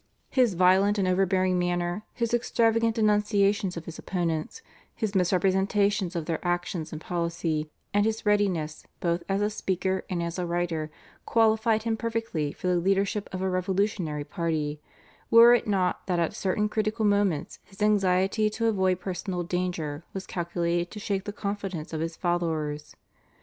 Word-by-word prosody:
His 245 -7 +3
violent 190 +3 +4
and 195 -2 +1
overbearing 185 0 +2
manner, 175 +2 -1
his 235 -1 -1
extravagant 230 -1 +2
denunciations 205 -3 +2
of 170 - -6
his 165 - -8
opponents, 175 - -3 0.3
his 215 -3 -2
misrepresentations 190 +1 +2
of 165 -2 -2
their 165 -1 -3
actions 175 -2 -2
and 155 - -5
policy, 170 -2 -2 0.2
and 205 0 +3
his 220 +1 -1
readiness 185 -7 +1 0.2
both 170 0 0
as 195 +1 +1
a 210 - +2
speaker 190 -2 -1
and 175 -2 -1
as 170 +2 -4
a 180 - -1
writer, 170 -3 -1 0.4
qualified 220 -1 +3
him 225 -1 0
perfectly 225 -10 -2
for - - -10
the 180 -1 +3
leadership 195 +3 0
of 185 0 -4
a 190 - +1
revolutionary 185 -4 -1
party, 155 -3 -2 0.5
were 235 +1 +8
it 240 - +2
not 190 -3 0
that 180 -2 +1
at 170 -1 0
certain 205 +2 0
critical 215 +1 -1
moments 200 -7 +1
his 195 - -19
anxiety 195 +1 +2
to 230 +2 -2
avoid 190 -4 +2
personal 180 -1 -3
danger 170 -4 -3
was 190 -1 -4
calculated 170 0 -1
to 210 - -8
shake 200 -2 -2
the 205 - -3
confidence 200 -6 -4
of 160 - -2
his 165 0 -3
followers. 160 -4 -2
185 Hz, 160 wpm, -27 LUFS, 170-205 Hz, 0.5 s, were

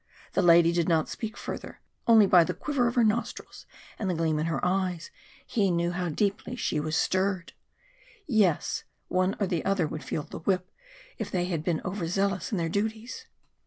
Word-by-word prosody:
The - - +2
lady 170 -1 +6
did 170 0 +1
not 160 -2 +2
speak 220 -1 -5
further, - - -7 0.3
only 225 -3 +7
by 180 -3 +6
the 180 +1 -3
quiver 255 +4 0
of 235 - -2
her 240 - +4
nostrils 225 +2 -2 0.3
and 200 - -1
the 180 - 0
gleam 160 -2 0
in 155 - -1
her 155 -5 -1
eyes 180 -2 -1 0.3
he 200 -4 +1
knew 170 0 +1
how 175 0 -2
deeply 205 +8 -1
she 155 - -1
was 155 +1 -2
stirred. 185 -1 0 0.7
Yes, 210 - +1 0.3
one 185 +2 +1
or 205 - +2
the 175 -3 -1
other 195 -4 +1
would 155 0 -5
feel 150 - -3
the - - -9
whip, 185 +1 -1 0.5
if - - -3
they 175 -1 0
had 170 -4 -2
been 165 -1 0
over 180 -2 -3
zealous 195 0 -1
in 205 - 0
their 165 -1 0
duties! 220 - -3
185 Hz, 195 wpm, -28 LUFS, 165-205 Hz, 0.7 s, only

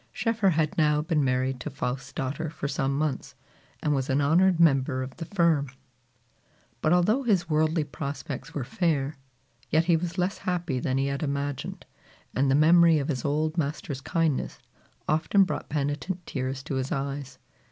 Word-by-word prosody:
Schoeffer 225 -4 +1
had 160 -1 0
now 150 -1 +3
been 155 -3 +1
married 130 0 0
to 150 - -5
Faust's 135 -1 -4
daughter 140 +4 -3
for 145 -2 -4
some 140 -1 -1
months, 150 -3 -2 0.5
and 150 - +2
was 135 -1 -1
an 135 +2 +2
honored 170 +5 +4
member 135 -4 +3
of 130 0 -8
the 165 - -5
firm. 165 -6 +2 1.1
But 155 - +2
although 185 +9 +3
his 195 -9 +1
worldly 155 +1 +2
prospects 140 -1 -6
were 140 - -3
fair, 145 0 -1 0.5
yet 160 +2 +3
he 170 -1 +4
was 170 +2 -3
less 180 +3 0
happy 175 -7 -2
than 130 +1 -1
he 135 - +1
had 140 0 -2
imagined, 140 -1 -3 0.5
and 135 +1 +2
the 135 - +4
memory 165 +2 +6
of 145 0 -2
his 130 -5 -2
old 155 +3 0
master's 140 -2 -3
kindness 160 -1 -1 0.5
often 160 +6 +3
brought 185 - -4
penitent 150 +5 -2
tears 130 0 -3
to 140 -2 -3
his 130 0 -3
eyes. 135 -1 -3
150 Hz, 170 wpm, -27 LUFS, 135-165 Hz, 1.1 s, memory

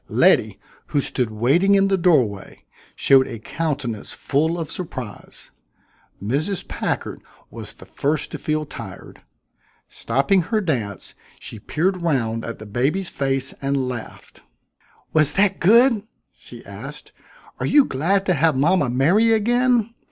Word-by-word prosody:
Letty, - - +3 0.3
who 145 - 0
stood 125 -3 -1
waiting 140 - +3
in 195 0 +4
the 195 - +2
doorway, 135 - 0 0.3
showed 135 -1 +4
a 115 - -6
countenance 135 -3 -4
full 160 +4 0
of 165 -2 -4
surprise. 130 - -8 0.7
Mrs. 145 - -2
Packard - - -3 0.3
was - - -8
the - - -15
first 145 +1 -2
to - - -6
feel 155 0 -1
tired. - - -10 0.7
Stopping 140 +11 +1
her 220 +6 -1
dance, 120 - -3 0.3
she 110 - -9
peered 180 - -1
round 115 -9 -1
at 115 - -6
the 110 - -10
baby's 135 - -1
face 135 -1 -1
and 135 -1 -1
laughed. 120 -3 -8 0.7
"Was 155 -2 +3
that 195 -1 +2
good?" 230 +4 +5 0.3
she - - -13
asked. - - -9 0.5
"Are - - -1
you 290 -2 +5
glad 190 +9 0
to 185 - +2
have 160 -2 +2
mama 150 -1 +2
merry 175 - +3
again? 235 +1 +2
155 Hz, 135 wpm, -21 LUFS, 130-195 Hz, 0.7 s, good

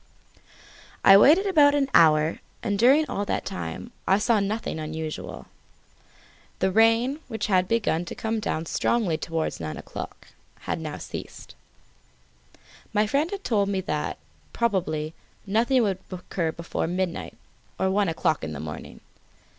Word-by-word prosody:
I 195 - +10
waited 305 - +6
about 295 -7 +5
an 280 -2 +2
hour, 155 0 +5 0.2
and 200 -3 -1
during 275 +7 +5
all 200 - -2
that - - -2
time 90 +1 -5 0.2
I 190 - +5
saw 215 +1 +2
nothing 205 -3 -2
unusual. 155 0 -5 1.1
The 190 0 +1
rain, 225 +7 +3
which 220 -2 -3
had 185 -3 +2
begun 210 -7 0
to - - -7
come 220 0 -2
down 165 -6 -2
strongly 195 0 +1
towards 165 -1 -3
nine 80 -2 -5
o'clock, - - -8 0.3
had - - -3
now - - -5
ceased. - - -8 1.4
My 210 0 +3
friend 280 +9 +1
had 400 0 -6
told 205 -4 +1
me 195 -1 0
that, 150 -5 -3 0.4
probably, 165 -9 -1 0.3
nothing 235 +5 +2
would 195 -3 0
occur 175 -2 -3
before 170 0 -3
midnight 180 0 -3 0.4
or 190 - +1
one 200 -1 +2
o'clock 160 - 0
in 80 -1 -4
the 75 - -6
morning. 75 0 -8
195 Hz, 145 wpm, -25 LUFS, 160-230 Hz, 1.4 s, I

